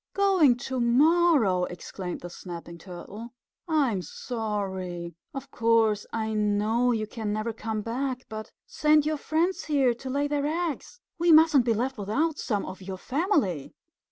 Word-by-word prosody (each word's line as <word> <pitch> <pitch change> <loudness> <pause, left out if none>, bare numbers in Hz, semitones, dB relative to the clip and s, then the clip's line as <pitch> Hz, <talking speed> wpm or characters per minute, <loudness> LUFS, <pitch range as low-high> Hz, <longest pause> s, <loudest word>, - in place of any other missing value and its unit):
"Going 375 -10 +4
to 260 +1 -4
morrow!" 255 - +4
exclaimed 180 0 -6
the 175 - -7
Snapping 170 -1 -9
Turtle. 200 +7 -9 0.3
"I'm 275 - +1
sorry. 190 -4 -4 0.2
Of 270 0 -8
course 225 -3 +2
I 220 -1 -2
know 215 +3 +2
you 220 -2 0
can 215 -1 -4
never 215 +2 -2
come 220 -1 -3
back, 255 +2 -3
but 215 0 -7
send 300 -1 +3
your 310 0 0
friends 330 +6 0
here 275 -5 +3
to 260 +3 -8
lay 285 +2 0
their 290 0 0
eggs. 340 - -3 0.2
We 340 0 +4
mustn't 310 -5 +6
be 230 -2 +2
left 250 +2 -2
without 290 +11 0
some 210 -5 -1
of 185 +1 -8
your 190 0 -6
family." 255 - -1
235 Hz, 155 wpm, -27 LUFS, 205-290 Hz, 0.3 s, mustn't